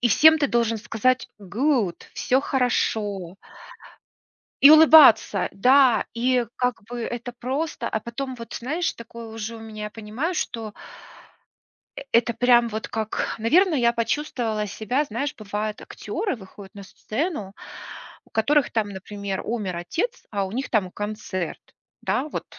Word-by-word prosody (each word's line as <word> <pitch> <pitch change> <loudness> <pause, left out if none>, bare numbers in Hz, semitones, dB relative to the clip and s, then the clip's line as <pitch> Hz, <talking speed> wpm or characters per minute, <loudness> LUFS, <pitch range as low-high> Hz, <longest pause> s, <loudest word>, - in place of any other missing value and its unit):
и 240 - +3
всем 315 +8 +6
ты 285 - +2
должен 230 -2 0
сказать: 250 +4 0
"Good. 210 - 0
Всё 260 +2 +1
хорошо". 210 -9 -1 1.3
И 280 - +10
улыбаться! 310 - +7
Да! 250 +1 +4
И 245 +1 +1
как 250 -5 -1
бы 240 0 -5
это 240 +1 -5
просто. 280 +7 -3
А 220 - -1
потом, 255 +3 -5
вот 230 -1 -10
знаешь, 310 +8 -2
такое 235 0 -10
уже 225 0 -6
у - - -10
меня, 215 -1 -7
я - - -5
понимаю, 225 +12 -4
что 220 -7 -4 1.2
э - - -5
это 235 0 +3
прям 240 0 +4
вот 220 0 -5
как, 220 -1 -3
наверно, 330 - +3
я 235 -3 +3
почувствовала 230 -3 -2
себя, 220 +8 -1
знаешь, 275 +4 -3
бывают 210 0 -4
актеры 400 - -4
выходят 195 -1 -13
на 200 - -9
сцену, 215 - -4 0.7
у - - -25
которых 285 +5 +2
там, 215 -3 0
например, 200 0 -5
умер 205 -6 -3
отец, 370 - -3
а 200 -2 -1
у 190 - -7
них 260 +4 -3
там 190 -5 0
концерт, 205 -4 -5 0.4
да? 290 +4 -1
Вот - - -5
230 Hz, 145 wpm, -24 LUFS, 210-260 Hz, 1.3 s, И